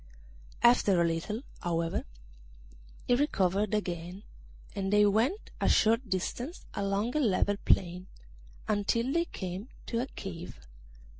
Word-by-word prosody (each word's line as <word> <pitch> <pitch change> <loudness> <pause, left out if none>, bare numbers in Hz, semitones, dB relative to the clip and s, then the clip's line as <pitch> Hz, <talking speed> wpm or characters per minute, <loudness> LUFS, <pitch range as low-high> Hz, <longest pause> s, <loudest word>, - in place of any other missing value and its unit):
After 235 -6 +5
a 170 - +4
little, 170 +9 -2 0.2
however, 165 -1 -1 1.0
he - - +3
recovered 210 - +2
again, 180 -1 -4 0.5
and 195 0 -2
they 210 0 +6
went 230 - +1
a - - +3
short 225 +2 +3
distance 240 - -3
along 200 +5 -1
a - - +3
level 205 -5 +2
plain, 180 0 +2 0.6
until 230 +5 +1
they 335 0 +2
came 190 - -6 0.2
to 230 - -2
a 255 - -3
cave. 180 -8 -8
205 Hz, 125 wpm, -30 LUFS, 180-235 Hz, 1.0 s, they